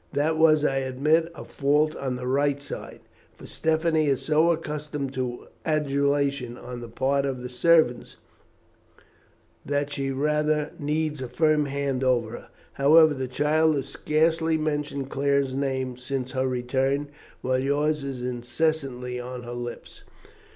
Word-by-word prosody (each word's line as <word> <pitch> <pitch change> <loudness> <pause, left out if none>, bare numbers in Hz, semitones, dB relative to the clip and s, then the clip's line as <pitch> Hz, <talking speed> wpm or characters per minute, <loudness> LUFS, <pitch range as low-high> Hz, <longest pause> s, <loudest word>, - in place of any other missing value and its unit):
That 150 +3 +1
was, 155 -2 +5
I 135 -2 +1
admit, 150 +6 +1
a - - -9
fault 150 +2 +1
on 130 -2 -3
the 125 0 -6
right 140 +2 +1
side, 140 - -8 0.3
for - - -13
Stephanie 160 -1 +1
is 135 -3 +1
so 155 +2 +3
accustomed 150 -3 -4
to 125 -2 -4 0.2
adulation 140 -4 0
on 125 -1 -8
the 120 - -8
part 135 +4 0
of 130 -2 -3
the 125 - -5
servants, 155 -1 +2 1.5
that 145 +1 -1
she 135 -1 -2
rather 150 +2 0
needs 150 -1 -1
a 130 - -3
firm 155 +3 +2
hand 140 -2 -2
over 120 -4 +1
her. - - -9 0.3
However, 155 +3 +6
the 130 -2 -3
child 155 +4 +2
has 140 -1 -3
scarcely 160 +1 +1
mentioned 145 -3 -2
Claire's 140 -1 +1
name 130 -2 -2
since 130 0 -4
her 130 0 0
return, 130 +3 0 0.3
while 130 0 +1
yours 145 +3 +1
is 135 -3 -5
incessantly 125 0 -2
on 125 0 -6
her 120 0 -7
lips." 120 0 -7
140 Hz, 145 wpm, -25 LUFS, 130-150 Hz, 1.5 s, However